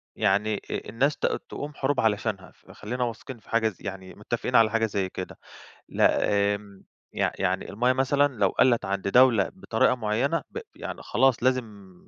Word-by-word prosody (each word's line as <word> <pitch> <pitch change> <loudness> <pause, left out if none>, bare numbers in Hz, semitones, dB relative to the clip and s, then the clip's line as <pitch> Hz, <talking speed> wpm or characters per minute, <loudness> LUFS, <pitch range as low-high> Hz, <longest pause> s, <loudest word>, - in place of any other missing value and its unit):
يعني 105 +1 +1
إ - - -7
إ - - -5
الناس 135 +7 +1
ت - - -2 0.2
تقوم 145 +1 -6
حروب 135 +1 0
علشانها، 105 -3 -1
فخلّينا 125 +4 -6
واثقين 120 +1 -6
في - - -23
حاجة 115 -1 +2
زي 95 - -16
يعني 95 -1 -7
متفقين 120 +4 -3
على 110 -1 +6
حاجة 115 0 +2
زي 100 -3 -2
كده، 90 - -7 0.5
لأ، - - +3 0.4
آمم 100 -1 -13 0.3
يع - - 0
يعني - - -1
المَيّة 125 +4 +1
مثلًا 140 +2 +2
لو 100 - +4
قلِت 120 -5 +2
عند 100 0 -2
دولة 115 -4 +5
بطريقة 125 - +1
معينة، 120 +8 0
ب 465 - -5 0.2
يعني - - -7
خلاص 130 -3 +2
لازم 110 -7 -2
115 Hz, 175 wpm, -26 LUFS, 100-130 Hz, 0.5 s, على